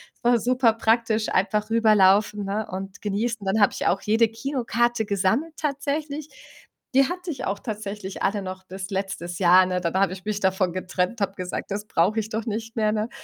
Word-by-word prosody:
Es -, -, -37 dB
war 240 Hz, 0 st, +4 dB
superpraktisch, 230 Hz, -2 st, +2 dB
einfach 210 Hz, +3 st, 0 dB
rüberlaufen, 210 Hz, -2 st, +4 dB
ne, 205 Hz, +2 st, -2 dB
und 190 Hz, +1 st, -6 dB
genießen. 210 Hz, +1 st, -2 dB
Dann 195 Hz, +3 st, +1 dB
habe 205 Hz, -, +5 dB
ich -, -, -2 dB
auch 195 Hz, -, +1 dB
jede 225 Hz, +2 st, +3 dB
Kinokarte 240 Hz, -1 st, -1 dB
gesammelt 215 Hz, -, 0 dB
tatsächlich. 295 Hz, +1 st, -3 dB, 0.7 s
Die 270 Hz, -, +7 dB
hatte 360 Hz, -1 st, -4 dB
ich 270 Hz, -, -5 dB
auch 200 Hz, +1 st, -2 dB
tatsächlich 205 Hz, -3 st, -6 dB
alle 205 Hz, 0 st, +1 dB
noch 185 Hz, 0 st, -7 dB
bis 190 Hz, +1 st, -7 dB
letztes 190 Hz, -3 st, -4 dB
Jahr, 185 Hz, 0 st, +6 dB
ne? 180 Hz, 0 st, -1 dB
Dann 170 Hz, -2 st, -1 dB
habe 190 Hz, -1 st, +2 dB
ich 185 Hz, -1 st, -10 dB
mich 210 Hz, -1 st, -2 dB
davon 190 Hz, -2 st, +1 dB
getrennt, 185 Hz, +4 st, -2 dB
habe 195 Hz, -1 st, 0 dB
gesagt, 180 Hz, -2 st, -5 dB
„das 205 Hz, +1 st, -3 dB
brauche 210 Hz, +3 st, +1 dB
ich 215 Hz, -, -4 dB
doch 220 Hz, 0 st, -3 dB
nicht 225 Hz, +1 st, -4 dB
mehr“, 215 Hz, -2 st, +2 dB
ne? 215 Hz, +1 st, -1 dB
210 Hz, 190 wpm, -24 LUFS, 190-230 Hz, 0.7 s, Die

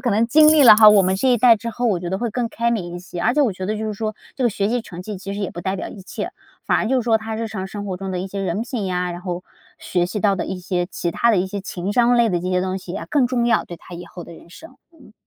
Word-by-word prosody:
可 240 Hz, -, 0 dB
能 220 Hz, +3 st, +2 dB
经 305 Hz, +5 st, +6 dB
历 310 Hz, -2 st, +6 dB
了 220 Hz, -4 st, +9 dB
哈 215 Hz, -1 st, +9 dB
我 210 Hz, -1 st, +6 dB
们 190 Hz, 0 st, +1 dB
这 260 Hz, +7 st, +1 dB
一 245 Hz, -1 st, +4 dB
代 230 Hz, 0 st, +6 dB
之 230 Hz, +2 st, -5 dB
后， 240 Hz, +2 st, -2 dB
我 195 Hz, -6 st, +1 dB
觉 175 Hz, 0 st, -5 dB
得 190 Hz, -, -1 dB
会 235 Hz, +2 st, -2 dB
更 235 Hz, +1 st, -2 dB
开 235 Hz, 0 st, 0 dB
明 180 Hz, -7 st, -3 dB
一 175 Hz, -, -5 dB
些。 175 Hz, -1 st, -8 dB
而 -, -, +3 dB
且 300 Hz, -, +2 dB
我 240 Hz, -7 st, +1 dB
觉 185 Hz, 0 st, -6 dB
得 215 Hz, +2 st, -2 dB
就 220 Hz, -, -3 dB
是 215 Hz, -, -3 dB
说， 215 Hz, +1 st, -3 dB, 0.2 s
这 260 Hz, -, -1 dB
个 240 Hz, -, +3 dB
学 200 Hz, 0 st, -1 dB
习 240 Hz, +1 st, -1 dB
成 175 Hz, -5 st, -9 dB
绩 210 Hz, +2 st, -6 dB
其 195 Hz, +1 st, -6 dB
实 205 Hz, -, -5 dB
也 195 Hz, -, -2 dB
不 175 Hz, -, -7 dB
代 190 Hz, +1 st, -2 dB
表 -, -, -5 dB
一 195 Hz, -, -11 dB
切， -, -, -5 dB, 0.4 s
反 -, -, +3 dB
而 -, -, -1 dB
就 265 Hz, -, +1 dB
是 -, -, -4 dB
说 225 Hz, -1 st, +3 dB
他 220 Hz, 0 st, -5 dB
日 225 Hz, 0 st, -3 dB
常 190 Hz, -4 st, -5 dB
生 205 Hz, +1 st, -7 dB
活 185 Hz, -, -3 dB
中 195 Hz, +1 st, -5 dB
的 185 Hz, -, -3 dB
一 185 Hz, -, -3 dB
些 195 Hz, +1 st, -5 dB
人 190 Hz, +2 st, -2 dB
品 235 Hz, -3 st, -4 dB
呀， 180 Hz, -1 st, -1 dB
然 175 Hz, -, -8 dB
后 180 Hz, -1 st, -4 dB, 0.4 s
学 175 Hz, -1 st, -1 dB
习 205 Hz, +3 st, -4 dB
到 200 Hz, -1 st, +3 dB
的 -, -, -2 dB
一 190 Hz, -, -4 dB
些 175 Hz, 0 st, -1 dB
其 175 Hz, -2 st, -3 dB
他 235 Hz, -, +2 dB
的 215 Hz, -, +3 dB
一 180 Hz, -, 0 dB
些 200 Hz, +1 st, -5 dB
情 190 Hz, +1 st, -4 dB
商 245 Hz, +2 st, +3 dB
类 235 Hz, -1 st, +4 dB
的 180 Hz, -4 st, 0 dB
这 180 Hz, +2 st, -3 dB
些 180 Hz, 0 st, +1 dB
东 185 Hz, 0 st, -2 dB
西 180 Hz, -1 st, -9 dB
呀， 200 Hz, -, -5 dB
更 285 Hz, -4 st, +2 dB
重 240 Hz, -1 st, 0 dB
要， 235 Hz, -, +2 dB
对 175 Hz, -, -10 dB
他 180 Hz, -, -12 dB
以 175 Hz, +1 st, -8 dB
后 175 Hz, 0 st, -10 dB
的 170 Hz, -, -12 dB
人 170 Hz, -, -16 dB
生。 325 Hz, -, -14 dB, 0.2 s
嗯。 290 Hz, -9 st, -19 dB
205 Hz, 370 characters per minute, -21 LUFS, 185-235 Hz, 0.4 s, 了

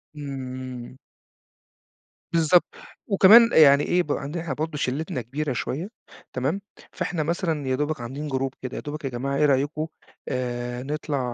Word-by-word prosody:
إمم، 135 Hz, -3 st, -6 dB
إمم. 130 Hz, 0 st, -8 dB, 1.4 s
بالضبط. 165 Hz, +1 st, +5 dB, 0.4 s
وكمان 220 Hz, +3 st, +7 dB
أ -, -, +1 dB
يعني 145 Hz, -2 st, +7 dB
إيه 180 Hz, 0 st, +2 dB
ب 150 Hz, -, -5 dB
عندنا 150 Hz, +5 st, -3 dB
إحنا 150 Hz, -5 st, -3 dB
برضه 155 Hz, +2 st, -3 dB
شِلِّتنا 135 Hz, -1 st, -2 dB
كبيرة 140 Hz, +4 st, -3 dB
شوية 160 Hz, -, -3 dB, 0.4 s
تمام؟ 140 Hz, +10 st, -1 dB, 0.3 s
فإحنا 160 Hz, -4 st, -2 dB
مثلًا 160 Hz, -3 st, -1 dB
يا 130 Hz, -, +1 dB
دوبك 150 Hz, -1 st, -2 dB
عاملين 135 Hz, +6 st, -5 dB
جروب 135 Hz, -1 st, -2 dB
كده، 130 Hz, -1 st, -5 dB
يا -, -, -4 dB
دوبك 150 Hz, 0 st, -6 dB
يا -, -, -1 dB
جماعة 135 Hz, +3 st, -3 dB
إيه 150 Hz, -, +4 dB
رأيكم 145 Hz, +3 st, +1 dB, 0.4 s
آآ 125 Hz, -1 st, -3 dB
نطلع 145 Hz, 0 st, -2 dB
145 Hz, 160 wpm, -25 LUFS, 130-155 Hz, 1.4 s, وكمان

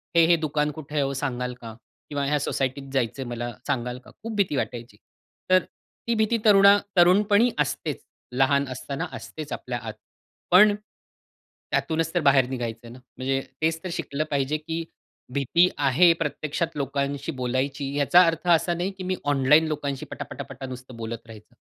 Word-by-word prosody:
"हे-हे 170 Hz, 0 st, +6 dB
दुकान 150 Hz, -1 st, 0 dB
कुठे 150 Hz, 0 st, -9 dB
आहे 145 Hz, -, +3 dB
ओ 135 Hz, -, -2 dB
सांगाल 125 Hz, -2 st, -3 dB
का?" 115 Hz, -1 st, -8 dB, 0.4 s
किंवा, 145 Hz, -1 st, -2 dB
"ह्या 150 Hz, +1 st, +1 dB
सोसायटीत 135 Hz, 0 st, -2 dB
जायचं 130 Hz, 0 st, -1 dB
मला 120 Hz, 0 st, -4 dB, 0.2 s
सांगाल 125 Hz, -2 st, -2 dB
का?" -, -, -14 dB
खूप 225 Hz, 0 st, -5 dB
भीती 195 Hz, -8 st, +1 dB
वाटायची. 120 Hz, -5 st, -4 dB, 0.5 s
तर 185 Hz, 0 st, +5 dB, 0.4 s
ती 235 Hz, -, +2 dB
भीती 220 Hz, +1 st, +2 dB
तरुणा 200 Hz, -1 st, +7 dB, 0.2 s
तरुणपणी 205 Hz, +6 st, +5 dB
असतेच 145 Hz, +1 st, -2 dB, 0.3 s
लहान 135 Hz, +2 st, +2 dB
असताना 140 Hz, +6 st, -4 dB
असतेच 155 Hz, -2 st, -8 dB
आपल्या 120 Hz, -1 st, -4 dB
आत. 110 Hz, -1 st, -5 dB, 0.6 s
पण, 205 Hz, +3 st, +7 dB, 1.0 s
त्यातूनच 165 Hz, 0 st, 0 dB
तर 175 Hz, -, +2 dB
बाहेर 135 Hz, -3 st, +4 dB
निघायचं 120 Hz, -3 st, -4 dB
आहे 115 Hz, -, -10 dB
ना? 125 Hz, -, -12 dB, 0.2 s
म्हणजे 135 Hz, +1 st, -1 dB, 0.2 s
तेचं 160 Hz, 0 st, +1 dB
तर 185 Hz, -, -4 dB
शिकलं 155 Hz, -3 st, -2 dB
पाहिजे 140 Hz, +2 st, 0 dB
की 165 Hz, +2 st, -4 dB, 0.5 s
भीती 145 Hz, +6 st, +3 dB
आहे 145 Hz, +5 st, +5 dB
प्रत्यक्षात 160 Hz, 0 st, -3 dB
लोकांशी 140 Hz, +1 st, -2 dB
बोलायची, 135 Hz, +2 st, -2 dB
याचा 175 Hz, +5 st, +6 dB
अर्थ 165 Hz, +1 st, -1 dB
असा 175 Hz, +2 st, 0 dB
नाही, 180 Hz, +3 st, -2 dB
की 190 Hz, -1 st, -9 dB
मी 185 Hz, 0 st, -1 dB
ऑनलाईन 145 Hz, +3 st, +4 dB
लोकांशी 145 Hz, -3 st, -3 dB
पटा-पटा-पटा 135 Hz, -, -7 dB
नुसतं 130 Hz, -1 st, -9 dB
बोलत 115 Hz, 0 st, -6 dB
राहायचं. 110 Hz, -2 st, -14 dB
145 Hz, 160 wpm, -25 LUFS, 130-165 Hz, 1.0 s, तरुणा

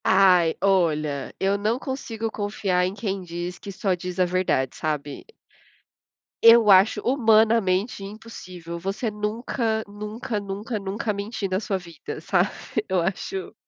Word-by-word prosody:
Ai, 180 Hz, -4 st, +5 dB
olha, 155 Hz, -7 st, +1 dB
eu 195 Hz, +1 st, +2 dB
não 215 Hz, +4 st, +1 dB
consigo 230 Hz, -5 st, -4 dB
confiar 205 Hz, -4 st, 0 dB
em 185 Hz, -, -4 dB
quem 200 Hz, -3 st, -3 dB
diz 175 Hz, 0 st, -5 dB
que 200 Hz, -, -8 dB
só 195 Hz, 0 st, 0 dB
diz 180 Hz, +1 st, -5 dB
a 180 Hz, -, +5 dB
verdade, 180 Hz, -8 st, 0 dB
sabe? 150 Hz, -2 st, -4 dB, 1.2 s
Eu 230 Hz, -2 st, +8 dB
acho 195 Hz, +3 st, +5 dB
humanamente 220 Hz, -5 st, +3 dB
impossível 185 Hz, -5 st, -8 dB
você 195 Hz, +5 st, -2 dB
nunca, 220 Hz, +1 st, -2 dB
nunca, 210 Hz, +2 st, -5 dB
nunca, 205 Hz, +3 st, -4 dB
nunca 205 Hz, +3 st, -2 dB
mentir 205 Hz, +1 st, -4 dB
na 185 Hz, 0 st, 0 dB
sua 200 Hz, -2 st, -2 dB
vida, 170 Hz, -3 st, -8 dB
sabe? 180 Hz, +4 st, +1 dB, 0.4 s
Eu 185 Hz, -1 st, +2 dB
acho 205 Hz, -, -3 dB
195 Hz, 135 wpm, -24 LUFS, 180-220 Hz, 1.2 s, Eu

